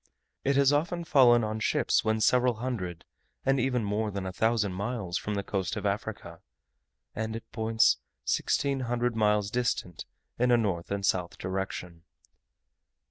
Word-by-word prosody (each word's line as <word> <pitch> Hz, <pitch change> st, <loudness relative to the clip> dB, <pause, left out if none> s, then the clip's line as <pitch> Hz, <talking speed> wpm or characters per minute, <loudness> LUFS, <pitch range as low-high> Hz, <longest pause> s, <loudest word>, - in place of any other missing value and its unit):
It 140 Hz, 0 st, +2 dB
has 140 Hz, 0 st, +4 dB
often 170 Hz, +4 st, 0 dB
fallen 125 Hz, -7 st, +5 dB
on 110 Hz, 0 st, -2 dB
ships -, -, +1 dB
when 110 Hz, 0 st, 0 dB
several 125 Hz, +2 st, +3 dB
hundred, 105 Hz, -8 st, -4 dB, 0.4 s
and 135 Hz, 0 st, +3 dB
even 125 Hz, -2 st, +1 dB
more 105 Hz, +1 st, -1 dB
than 100 Hz, -2 st, -4 dB
a 95 Hz, -, -4 dB
thousand 110 Hz, -1 st, +1 dB
miles 100 Hz, -2 st, -3 dB
from 105 Hz, -, -3 dB
the 100 Hz, -, -2 dB
coast 95 Hz, 0 st, -2 dB
of 105 Hz, -2 st, -4 dB
Africa, 100 Hz, -4 st, -4 dB, 0.7 s
and 110 Hz, 0 st, -3 dB
at 115 Hz, -, -8 dB
points 110 Hz, 0 st, +2 dB, 0.3 s
sixteen 140 Hz, -1 st, +1 dB
hundred 120 Hz, -1 st, -1 dB
miles 105 Hz, -2 st, +2 dB
distant 115 Hz, -8 st, -2 dB, 0.3 s
in 125 Hz, +1 st, +3 dB
a 120 Hz, -, +5 dB
north 95 Hz, -7 st, -1 dB
and 100 Hz, 0 st, -2 dB
south 90 Hz, -2 st, 0 dB
direction. 95 Hz, -2 st, -4 dB
110 Hz, 155 wpm, -28 LUFS, 100-125 Hz, 0.7 s, fallen